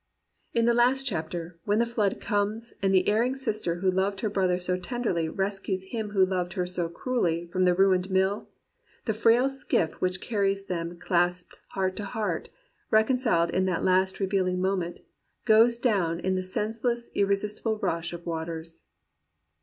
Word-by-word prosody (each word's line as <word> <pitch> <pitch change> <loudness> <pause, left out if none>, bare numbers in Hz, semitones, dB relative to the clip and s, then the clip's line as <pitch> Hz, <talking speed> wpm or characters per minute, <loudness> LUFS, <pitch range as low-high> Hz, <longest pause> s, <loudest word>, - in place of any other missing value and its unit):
In 230 -1 +3
the 235 - +4
last 250 +3 +3
chapter, 165 -2 -4
when 205 +1 +2
the 235 - +3
flood 220 -4 0
comes, 210 +3 -1
and 195 -1 +2
the 190 -1 +3
erring 235 +5 +2
sister 215 -9 -2
who 185 +2 +1
loved 190 +1 0
her 215 - -1
brother 185 -3 +1
so 180 0 -1
tenderly, 180 -4 -2
rescues 195 +1 -2
him 220 -3 -3
who 195 -2 +4
loved 180 -2 -2
her 180 - -1
so 180 -2 -2
cruelly 170 -4 -1
from 185 0 +2
the 180 -1 +4
ruined 190 0 +3
mill, 190 +2 +1 0.6
the 220 - 0
frail 230 +4 +4
skiff 270 -11 0
which 185 0 0
carries 195 -2 0
them 170 -1 -4
clasped 175 +1 0
heart 190 -1 -1
to 205 - -4
heart, 215 0 -3 0.4
reconciled 220 -6 +3
in 185 +1 +1
that 185 +1 +1
revealing 190 -2 0
moment, 185 -2 -1 0.4
goes 230 +1 +5
down 190 -9 +1
in 190 +1 0
the 185 - 0
senseless 225 +5 -2
irresistible 205 +2 0
rush 175 -4 -2
of 170 0 -8
waters. 165 0 -5
190 Hz, 160 wpm, -27 LUFS, 180-220 Hz, 0.6 s, goes